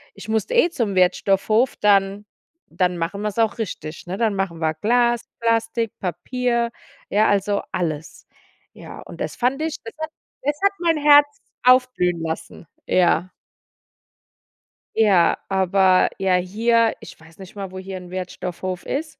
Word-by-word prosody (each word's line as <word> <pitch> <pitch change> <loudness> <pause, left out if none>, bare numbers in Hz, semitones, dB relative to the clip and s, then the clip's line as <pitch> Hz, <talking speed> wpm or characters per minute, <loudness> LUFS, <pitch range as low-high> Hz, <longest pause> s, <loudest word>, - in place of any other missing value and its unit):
ich 200 - -11
musste 220 - -1
eh 470 -7 +5
zum 220 - -2
Wertstoffhof. 195 +6 +2
Dann 200 0 +2 0.5
dann 180 0 0
machen 170 +4 -3
wir's 210 0 -3
auch 225 +1 +1
richtig, 165 -6 -6
ne? 180 - -3
Dann 225 -2 +1
machen 195 -4 -3
wir 160 -1 0
Glas, 240 +5 +2 0.2
Plastik, 230 -1 0
Papier, 235 +7 -1 0.4
ja, 215 +2 +3
also, 200 0 +1
alles. 160 -3 -4 0.5
Ja, - - -11
und - - -12
das - - -3
fand 260 +4 0
ich 320 -1 -2
das 225 - -9
hat 315 0 -3 0.3
das 290 +2 0
hat 400 - +5
mein 335 -2 +2
Herz 290 -1 +5 0.2
aufblühen 250 -9 +3
lassen, 160 +1 -6 0.2
ja. 180 0 +2 1.7
Ja, 195 -6 +4
aber, 190 -1 +3
ja, 190 -1 +2
hier, 225 +5 +2
ich - - -12
weiß 160 0 -18
nicht 190 0 -12
mal, 195 -1 -5
wo 190 - -9
hier 190 0 -7
'n 180 -1 -11
Wertstoffhof 185 0 -5
ist, 310 +3 -4
200 Hz, 150 wpm, -22 LUFS, 180-235 Hz, 1.7 s, eh